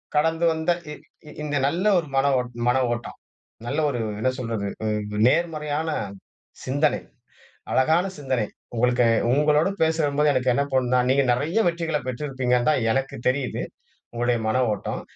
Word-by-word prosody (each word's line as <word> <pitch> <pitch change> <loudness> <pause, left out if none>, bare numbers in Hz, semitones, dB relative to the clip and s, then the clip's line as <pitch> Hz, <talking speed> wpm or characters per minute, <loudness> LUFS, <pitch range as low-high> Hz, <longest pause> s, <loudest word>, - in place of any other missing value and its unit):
கடந்து 160 +2 +2
வந்த 160 +2 0 0.2
இ - - -5 0.4
இந் - - -13
இந்த 145 -1 -1
நல்ல 170 +7 -1
ஒரு 165 - -6
மன 135 - +3
ஓட் 125 -1 -4 0.2
மன 125 +1 +3 0.2
ஓட்டம், 120 - -7 0.5
நல்ல 120 - -1
ஒரு 125 -4 -3 0.2
என்ன 130 - +1
சொல்றது, 115 -4 -3 0.2
அ - - 0 0.4
நேர்மறையான 155 0 0 0.8
சிந்தனை. 145 +3 +1 0.7
அழகான 160 +7 +3
சிந்தனை. 130 -6 -1 0.3
உங்களுக்கு 125 +1 +2 0.3
உங்களோட 150 +4 +3
பேசுறம் 160 -3 +1
போது, 150 -1 +4
எனக்கு 130 -1 +2
என்ன 140 - +2
தோணுனா, 125 -1 +2
நீங்க 140 +1 +4
நிறைய 150 - 0
வெற்றிகள்ல 165 -3 -1
பெற்றிருப்பீங்கன்னு 125 -2 -1
தான் 130 - +1
எனக்கு 135 +1 -2
தெரியுது. 130 0 -1 0.5
உங்களுடைய 120 0 0
மன 130 +4 +2
ஓட்டம். 105 - -4
140 Hz, 145 wpm, -24 LUFS, 125-155 Hz, 0.8 s, போது